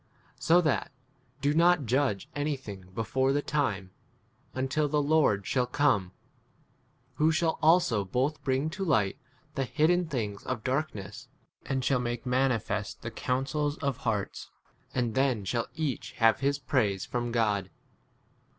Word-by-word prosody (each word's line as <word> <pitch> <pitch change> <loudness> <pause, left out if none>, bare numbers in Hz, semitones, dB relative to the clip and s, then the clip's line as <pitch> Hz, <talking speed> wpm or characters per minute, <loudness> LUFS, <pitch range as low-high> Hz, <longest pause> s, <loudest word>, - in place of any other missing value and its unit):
So 175 +2 +5
that 155 -4 0 0.5
do 145 +1 +2
not 170 -2 +4
judge 125 -4 +1
anything 135 -10 -4
before 130 +4 +1
[the] 145 +1 0
time, 105 -11 -1 0.6
until 135 +3 0
the 150 +1 +2
Lord 145 -9 +2
shall 125 -2 +1
come, 125 -9 +2 1.1
who 155 +1 +4
shall 160 0 0
also 160 - +4
both 130 +10 -1
bring 135 +4 0
to 190 +4 -4
light 110 - +1 0.3
the 135 - -1
hidden 165 +6 +2
things 105 -9 -3
of 125 -4 -4
dark 140 +3 -1
ness, 105 +6 -8 0.4
and 130 -2 -1
shall 130 -2 +2
make 120 +1 -3
manifest 125 -2 0
the - - -4
counsels 145 +4 -1
of 140 -2 -2
hearts; 105 -4 -3 0.5
and 120 -3 0
then 130 -6 +1
shall 115 +4 -1
each 155 -4 -3
have 115 -1 +3
[his] 140 +1 +1
praise 110 -8 0
from 120 -1 -2
God. 105 -5 +1
130 Hz, 140 wpm, -29 LUFS, 115-150 Hz, 1.1 s, So